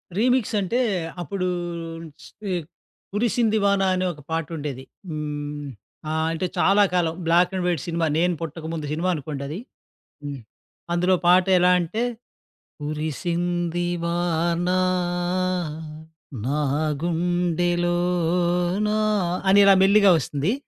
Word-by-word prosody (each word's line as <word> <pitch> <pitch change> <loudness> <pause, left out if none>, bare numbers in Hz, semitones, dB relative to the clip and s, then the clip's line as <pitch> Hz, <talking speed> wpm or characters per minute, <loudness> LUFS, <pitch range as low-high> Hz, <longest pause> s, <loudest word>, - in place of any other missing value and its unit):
Remix 245 +2 +2
అంటే 200 +6 0 0.4
అప్పుడూ 185 +2 -2 1.7
'కురిసిoది 225 0 +1
వానా' 200 -1 +3
అనే, 185 0 0
ఒక 150 - -14
పాట 165 -1 0
ఉండేది. 140 -3 -5 0.3
హ్మ్. 150 -1 -4 0.4
ఆహ్, 160 0 0
అంటే 165 +3 -2
చాలా 200 +2 +5
కాలం, 170 -3 +1
బ్లాక్ 175 +2 +4
అండ్ 185 - -1
వైట్ 170 -5 0
సినిమా, 165 -1 0
నేను 180 +2 +2
పుట్టకముందు 160 -1 -5
సినిమా 170 +4 -1
అనుకోండది. 145 +2 -5 0.6
హ్మ్. 145 -1 -5 0.5
అందులో 180 +2 +3
పాట 180 +1 +6
ఎలా 180 +1 +5
అంటే, 180 +7 -2 0.8
కురిసింది 175 +3 -2 0.2
వానా, 175 +1 0 1.7
నాగుండెలోనా 175 +5 0 0.5
అని 200 - +6
ఇలా 195 - +8
మెల్లిగా 200 +1 +6
వస్తుంది. 145 - -1
175 Hz, 100 wpm, -24 LUFS, 155-185 Hz, 1.7 s, ఇలా